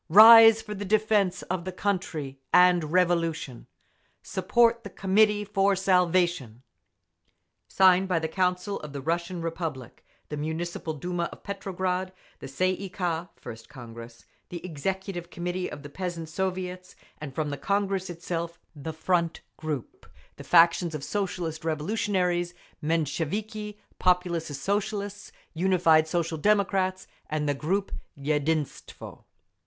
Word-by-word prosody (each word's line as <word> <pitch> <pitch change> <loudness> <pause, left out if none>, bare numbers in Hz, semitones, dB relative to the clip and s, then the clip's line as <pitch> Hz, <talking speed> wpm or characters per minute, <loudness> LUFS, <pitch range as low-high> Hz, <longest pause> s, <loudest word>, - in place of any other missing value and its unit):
Rise 225 +3 +9
for 210 -1 -6
the 205 0 -5
defence 205 -3 +1
of 180 -1 -3
the 185 - -4
country 175 -8 -3
and 180 -2 +5
Revolution! 165 -7 0 0.6
Support 235 0 +2
the 200 - -7
Committee 210 +2 +2
for 200 -1 +2
Salvation! 180 - +1 1.0
Signed 190 0 +4
by 180 -3 +1
the 160 -1 -1
Council 180 +3 -1
of 150 -2 -9
the 140 - -4
Russian 170 +3 -2
Republic, 160 -7 -5 0.3
the 150 - -4
Municipal 160 +1 -4
Duma 175 +3 -3
of - - -13
Petrograd, 185 -1 -3 0.3
the - - -8
Tsay 185 +8 +1
ee 195 - -6
kah 175 -2 -2
(First 115 0 -10
Congress), 115 -2 -11 0.2
the 175 0 -7
Executive 180 +2 -4
Committee 175 +1 -3
of 145 - -9
the - - -7
Peasants' 170 -1 -5
Soviets, 185 -1 -3 0.2
and 140 -3 -8
from 150 -2 -1
the - - -2
Congress 195 +2 -1
itself 170 0 -4 0.2
the 150 +2 -6
Front 170 +1 0
group, 150 -6 -6 0.3
the - - -10
factions 170 -1 +4
of 145 - -5
Socialist 180 -5 -3
Revolutionaries, 175 +1 -1 0.3
Mensheviki, 185 +7 -2 0.2
Populist 175 -3 +1
Socialists, 205 +3 -3 0.2
Unified 165 -3 +3
Social 165 -1 -1
Democrats, 195 -1 +1 0.2
and 150 -1 -1
the 145 - +2
group 185 +8 -1 0.3
"Yedinstvo." 150 +1 -3
175 Hz, 125 wpm, -27 LUFS, 160-190 Hz, 1.0 s, Rise